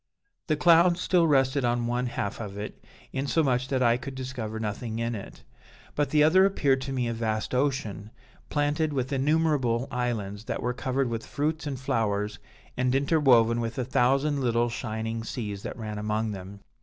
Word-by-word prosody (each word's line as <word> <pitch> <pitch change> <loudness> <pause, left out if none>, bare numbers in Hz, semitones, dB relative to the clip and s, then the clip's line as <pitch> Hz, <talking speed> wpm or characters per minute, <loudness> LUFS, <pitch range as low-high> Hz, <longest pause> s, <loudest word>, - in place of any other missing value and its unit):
"The 155 - +2
clouds 170 +2 +5
still 175 -2 +3
rested 135 -1 +3
on 120 0 +1
one 120 +1 -1
half 100 -4 -3
of 100 -2 -6
it, 105 +1 -7 0.3
insomuch 135 -2 +1
that 130 -2 +1
I 120 0 +4
could 130 +1 -7
discover 125 -4 -5
nothing 110 +1 -4
in 115 +1 -1
it; 100 -3 -8 0.5
but 145 -2 0
the 150 +1 +4
other 180 +5 +6
appeared 140 -9 +2
to 135 +1 -4
me 125 -2 -1
a 115 - -1
vast 110 0 -2
ocean, 125 -6 -1 0.4
planted 145 +1 0
with 130 0 -2
innumerable 140 -4 +1
islands 110 -4 -3
that - - -3
were 125 +1 0
covered 130 +1 -1
with 115 -1 -3
fruits 155 +1 -2
and 135 -3 -4
flowers 105 -4 -1 0.4
and 125 +1 +1
interwoven 130 -5 +4
with 115 0 -4
a 130 - -1
thousand 135 +4 +2
little 120 -1 +1
shining 115 -1 -4
seas 105 -3 -5
that - - -6
ran 105 -2 -5
among 105 +1 -1
them. 100 0 -8
125 Hz, 175 wpm, -27 LUFS, 115-140 Hz, 0.5 s, other